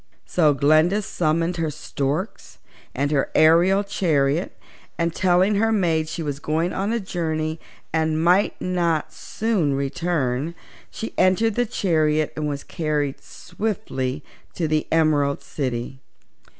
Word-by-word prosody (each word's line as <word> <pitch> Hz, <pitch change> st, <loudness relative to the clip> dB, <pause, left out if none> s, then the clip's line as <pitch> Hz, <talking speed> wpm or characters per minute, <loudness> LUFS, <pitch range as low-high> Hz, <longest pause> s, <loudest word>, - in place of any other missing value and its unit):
So 155 Hz, -5 st, +3 dB
Glinda 155 Hz, +8 st, +3 dB
summoned 170 Hz, 0 st, 0 dB
her 165 Hz, -2 st, 0 dB
storks 145 Hz, +6 st, -4 dB, 0.4 s
and 140 Hz, +2 st, 0 dB
her 140 Hz, -3 st, +1 dB
aerial 175 Hz, +5 st, +5 dB
chariot, 160 Hz, -5 st, 0 dB, 0.4 s
and 170 Hz, -1 st, 0 dB
telling 185 Hz, +3 st, +3 dB
her 225 Hz, +2 st, +2 dB
maids 165 Hz, -7 st, +1 dB
she 165 Hz, -, -4 dB
was 145 Hz, -2 st, -4 dB
going 160 Hz, +4 st, -1 dB
on 200 Hz, +3 st, -1 dB
a 235 Hz, -, 0 dB
journey 160 Hz, -4 st, -3 dB, 0.3 s
and 160 Hz, -1 st, +1 dB
might 180 Hz, +4 st, +3 dB
not 170 Hz, -4 st, -1 dB
soon 195 Hz, -11 st, -1 dB
return, 145 Hz, 0 st, -1 dB, 0.3 s
she 225 Hz, -, -6 dB
entered 190 Hz, +5 st, +3 dB
the 245 Hz, +2 st, 0 dB
chariot 155 Hz, -6 st, +1 dB
and 150 Hz, 0 st, -2 dB
was 145 Hz, -1 st, -4 dB
carried 150 Hz, -3 st, -2 dB
swiftly 155 Hz, -9 st, -4 dB, 0.3 s
to 165 Hz, -, -1 dB
the 155 Hz, 0 st, 0 dB
Emerald 150 Hz, -3 st, +2 dB
City. 130 Hz, -2 st, -4 dB
160 Hz, 130 wpm, -23 LUFS, 150-180 Hz, 0.4 s, aerial